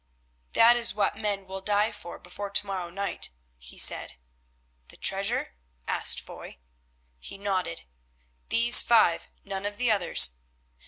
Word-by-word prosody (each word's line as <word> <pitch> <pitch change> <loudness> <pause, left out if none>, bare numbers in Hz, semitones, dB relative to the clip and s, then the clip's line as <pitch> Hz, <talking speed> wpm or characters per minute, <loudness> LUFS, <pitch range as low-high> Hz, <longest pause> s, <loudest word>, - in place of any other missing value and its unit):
"That 235 +1 +6
is 235 -2 +1
what 210 - 0
men 205 -2 -3
will 190 0 -7
die 205 +2 +1
for 175 - -10
before 200 +3 -8
to 200 +1 +1
morrow 185 -3 -5
night," 195 +2 -4 0.3
he 60 0 -8
said. - - +1 0.7
"The - - -14
treasure?" - - +1 0.3
asked - - 0
Foy. - - -12 0.6
He 195 - -9
nodded. 195 - -3 0.7
"These 235 +1 +7
five, 215 -8 +3 0.2
none 195 -1 -6
of 205 0 -5
the 245 -2 +1
others." 60 - +3
200 Hz, 140 wpm, -26 LUFS, 190-215 Hz, 0.7 s, These